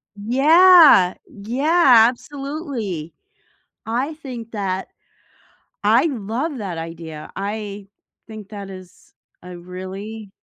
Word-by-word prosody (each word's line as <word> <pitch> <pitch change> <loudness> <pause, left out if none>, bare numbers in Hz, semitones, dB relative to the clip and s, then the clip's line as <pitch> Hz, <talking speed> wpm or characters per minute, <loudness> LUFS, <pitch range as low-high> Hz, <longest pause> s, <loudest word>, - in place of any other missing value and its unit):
Yeah, 290 - +6
yeah, 250 +3 +3
absolutely. 260 - -6 0.7
I 255 +7 -2
think 245 -7 -9
that 190 -3 -3 1.0
I 230 +8 +4
love 260 +3 -3
that 190 -6 -5
idea, 165 -2 -8
I 205 -1 -5 0.4
think 215 -2 -10
that 200 -2 -8
is 185 -1 -14 0.3
a 180 0 -10
really 190 +4 -8
215 Hz, 90 wpm, -20 LUFS, 190-270 Hz, 1.0 s, Yeah